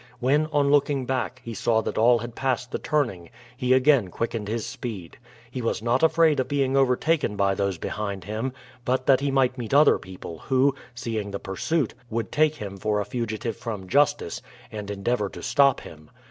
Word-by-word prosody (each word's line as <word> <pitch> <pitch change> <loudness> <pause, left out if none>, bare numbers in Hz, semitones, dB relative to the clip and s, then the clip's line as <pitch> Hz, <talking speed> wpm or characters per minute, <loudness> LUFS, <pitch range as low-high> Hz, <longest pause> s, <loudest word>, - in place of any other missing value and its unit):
When, 145 +5 +2
on 145 -2 +2
looking 140 -2 +2
back, 130 0 -2
he 115 - -5
saw 110 0 +1
that - - -4
all 120 +2 +5
had 120 0 -6
passed 125 -1 -2
the - - -2
turning, 110 - -1 0.3
he 125 0 -1
again 130 -4 +5
quickened 115 +2 -3
his 110 +1 -2
speed. 100 -9 -7 0.3
He 125 - -4
was 115 -1 -2
not 120 +2 +2
afraid 160 -2 +4
of 130 - 0
being 135 -2 0
overtaken 135 -1 +2
by 100 -1 +2
those 100 -2 -1
behind 100 +1 -4
him, 110 +7 -3 0.3
but 130 0 0
that 135 -2 +5
he 140 +1 -1
might 130 -1 +1
meet 120 +3 -2
other 150 +2 +6
people 90 -3 -9
who, 135 +1 +2 0.2
seeing 110 -3 -3
the 100 0 -5
pursuit, 135 - -1 0.2
would 115 0 -3
take 155 0 +3
him 100 -6 -7
for 105 +1 0
a 105 - -2
fugitive 115 0 -3
from 105 -5 -6
justice, 145 - +1 0.3
and 105 -2 -6
endeavor 105 +1 -1
to - - -10
stop 140 -3 +3
him. 75 -1 -13
120 Hz, 190 wpm, -25 LUFS, 105-135 Hz, 0.3 s, other